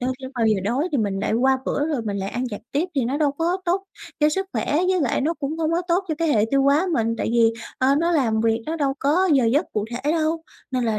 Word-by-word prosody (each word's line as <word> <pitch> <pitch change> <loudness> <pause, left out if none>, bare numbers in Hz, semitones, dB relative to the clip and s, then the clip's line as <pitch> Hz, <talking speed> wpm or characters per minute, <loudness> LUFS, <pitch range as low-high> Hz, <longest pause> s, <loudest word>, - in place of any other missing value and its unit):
tới 250 +1 -1
khi 260 - -6
bao 230 -2 +1
giờ 215 -3 +2
đói 255 - 0
thì 280 - +1
mình 200 -3 -1
lại - - -1
qua 260 +4 +3
bữa 290 +2 -1
rồi 290 -7 -1
mình 205 -2 -3
lại 195 0 -3
ăn 250 0 -3
vặt 205 - -6
tiếp, 310 +6 0
thì 270 -4 +1
nó 260 +4 -1
đâu 295 -3 +2
có 335 +5 0
tốt 370 +3 0 0.4
cho 300 - +5
sức 385 +5 -1
khỏe, 290 - -1
với 370 -1 +2
lại 265 -6 0
nó 320 +5 0
cũng 290 +1 -4
không 320 -1 0
có 345 - +1
tốt 355 +3 +2
cho 315 - 0
cái 330 - +1
hệ 215 -8 +3
tiêu 275 0 +3
hóa 285 +7 +3
mình, 230 -5 +1
tại - - -1
vì, 230 -1 +4 0.3
ờ, 265 +1 +3
nó 335 +4 +1
làm 230 -8 +2
việc 225 0 +1
nó 320 +2 -2
đâu 280 -3 0
có 335 +7 +2
giờ 270 -4 +4
giấc 275 +9 +2
cụ 210 -1 -1
thể 265 +6 -1
đâu, 320 0 0 0.3
nên 255 -2 0
là 220 -2 0
275 Hz, 290 wpm, -23 LUFS, 230-320 Hz, 0.4 s, cho